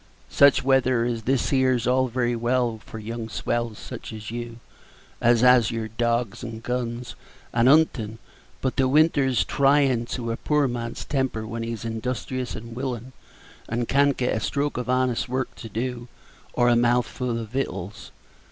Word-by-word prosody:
"Such 140 -2 +5
weather 130 -3 +3
as 120 -2 -2
this 135 0 +1
here's 130 -3 +2
all 130 +1 +3
very 120 0 0
well 120 -1 0
for 110 - -9
young 115 +1 -5
swells 120 -2 -2
such - - -8
as 110 0 -7
you, 120 -1 -6 0.6
as 120 -1 +4
has 125 -3 +6
your 115 -1 -3
dawgs, 115 -1 -1
and 115 -2 -7
guns, 125 0 -3 0.4
and 120 +2 +4
'untin'; 130 -8 +3 0.4
but 130 0 -1
the 135 -1 +3
winter's 140 -3 +3
tryin' 135 -4 +3
to 115 -2 -3
a 115 - -3
poor 150 -2 +1
man's 120 -1 -4
temper 130 -6 -1
when 115 +1 -5
he's 115 -1 -4
industrious 125 +2 -3
and 115 +1 -8
willin', 130 -1 -4 0.6
and 115 +1 -1
can't 140 0 +3
get 125 -3 0
a - - 0
stroke 140 +5 -1
of 125 0 -4
honest 130 -2 +1
work 130 +1 -2
to 115 - -8
do, 120 +2 -4 0.5
or 120 - +3
a 120 - +5
mouthful 120 0 +1
of 115 -2 -5
vittals. 115 -5 -4
120 Hz, 165 wpm, -24 LUFS, 115-130 Hz, 0.6 s, has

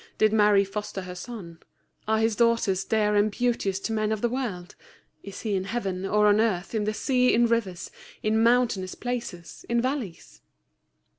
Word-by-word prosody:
Did 215 0 +3
Mary 210 -2 +5
foster 200 0 -5
her 180 -1 -7
son? 180 -4 -9 0.5
Are 220 0 +2
His 220 0 +1
daughters 230 -5 +2
dear 210 -1 +1
and 205 +1 +3
beauteous 210 -4 -1
to 225 - -3
men 215 -1 0
of 215 -1 -2
the 240 - +1
world? 225 -9 -4 0.5
Is 200 0 -9
He 215 -3 -2
in 190 0 -2
heaven, 195 -4 -3
or 210 +1 +3
on 210 +1 +5
earth, 195 -4 -1
in 215 -2 0
the 215 - -1
sea, 250 0 +2
in 240 +1 +4
rivers, 215 -6 -1 0.3
in 220 +1 +2
mountainous 230 -6 +2
places, 235 -9 -6
in 235 0 +2
valleys?" 245 - -4
215 Hz, 175 wpm, -26 LUFS, 195-235 Hz, 0.5 s, Mary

